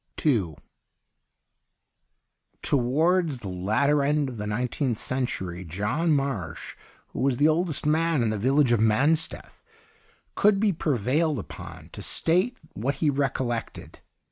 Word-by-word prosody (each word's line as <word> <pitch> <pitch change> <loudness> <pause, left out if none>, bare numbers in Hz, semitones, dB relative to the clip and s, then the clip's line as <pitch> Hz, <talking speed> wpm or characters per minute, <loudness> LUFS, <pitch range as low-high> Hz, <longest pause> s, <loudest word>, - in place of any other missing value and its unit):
II 100 - +2 2.1
Towards 150 +3 +1
the 100 - -5
latter 110 +11 +1
end 145 0 +1
of 125 - -8
the 105 0 -4
nine 120 +4 -1
teenth 125 -5 -1
century, 95 -10 -3
John 105 - -1
Marsh, 135 - -2 0.3
who - - -7
was 135 -2 +1
the 145 - +4
oldest 160 -1 +1
man 160 -2 +2
in 110 - +1
the 110 - -2
village 135 +3 +3
of 120 - +3
Mansteth, 135 +9 +1 0.7
could 205 -1 +3
be 205 -2 +2
prevailed 150 +1 0
upon 105 - -9
to - - -9
state 185 +10 0 0.2
what 130 +7 -2
he 150 -3 +1
recollected. 135 -4 -3
135 Hz, 130 wpm, -26 LUFS, 110-155 Hz, 2.1 s, the